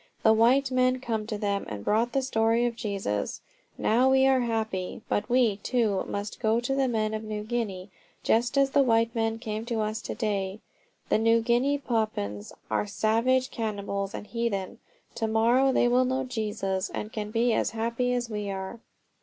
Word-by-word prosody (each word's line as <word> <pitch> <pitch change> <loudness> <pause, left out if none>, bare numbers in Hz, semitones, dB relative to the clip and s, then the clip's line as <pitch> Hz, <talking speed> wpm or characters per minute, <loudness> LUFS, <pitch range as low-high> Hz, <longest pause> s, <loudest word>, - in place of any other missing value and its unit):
"The 220 - +6
white 255 +5 +4
men 255 0 +2
came 225 -4 -3
to 215 - -3
them 200 -1 -1
and 105 -2 -6
brought 230 +3 +2
the 270 - +1
story 230 -1 +2
of 240 -1 -1
Jesus. 195 - -3 0.4
Now 245 +4 +3
we 265 0 +5
are 265 -1 +4
happy. 220 -5 -2
But 205 - -1
we, 240 -5 +3
too, 215 -3 0
must 205 +1 -5
go 225 0 +2
to 245 +3 -2
the 270 -1 +2
men 220 -3 0
of 215 0 -3
New 215 -1 -4
Guinea, 210 -5 -3 0.3
just 240 +4 +2
as 275 -1 +4
the 280 - +4
white 230 -2 +2
men 225 -1 0
came 220 -2 -4
to 235 -2 -2
us. 215 +2 -2
To - - -5
day 205 -3 -2 0.5
the - - +3
New 230 +1 +4
Guinea 245 +5 +2
Papuans 215 - -2 0.2
are - - 0
savage 230 +6 +1
cannibals 200 -3 -3
and - - -6
heathen. 220 -5 -3 0.3
To 225 - -2
morrow 235 +5 +3
they 245 - +3
will 250 +1 +3
know 260 +1 0
Jesus 210 -6 -2
and 210 - -5 0.2
be 230 +1 +2
as - - +1
happy 235 +3 -1
as 245 -1 -1
we 210 -2 -4
are." 190 +3 -5
225 Hz, 185 wpm, -27 LUFS, 210-245 Hz, 0.5 s, The